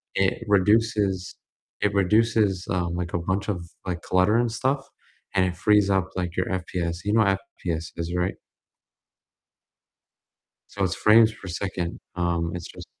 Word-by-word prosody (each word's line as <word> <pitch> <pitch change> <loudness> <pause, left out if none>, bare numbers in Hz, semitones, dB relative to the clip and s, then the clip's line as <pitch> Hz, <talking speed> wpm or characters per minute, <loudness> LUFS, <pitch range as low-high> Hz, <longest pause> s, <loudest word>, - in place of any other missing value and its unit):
it 95 +4 +1
reduces 105 -2 +2 0.5
it 105 -1 +1
reduces, 105 -1 +2
um, 90 -3 -1
like, 90 -1 -4
a 85 - +1
bunch 95 +4 -2
of 85 -3 -3 0.2
like, 85 -2 -3
clutter 95 +4 +3
and 120 -1 +1
stuff, 135 +4 -1 0.5
and 95 -1 +4
it 90 -2 -3
frees 105 +1 +4
up 95 -1 +1
like 90 -2 -3
your 90 - +1
FPS, 90 -2 -2
you 105 - +1
know 110 - +5
FPS 90 -3 -2
is 85 +1 -3
right? 90 +1 0 2.3
So, 100 - -4
it's 90 -3 0
frames 110 +1 +6
per 110 - -12
second, 90 -1 -4 0.2
um, 85 -1 0
it's 90 -2 -5
just - - -11
95 Hz, 150 wpm, -25 LUFS, 90-105 Hz, 2.3 s, frames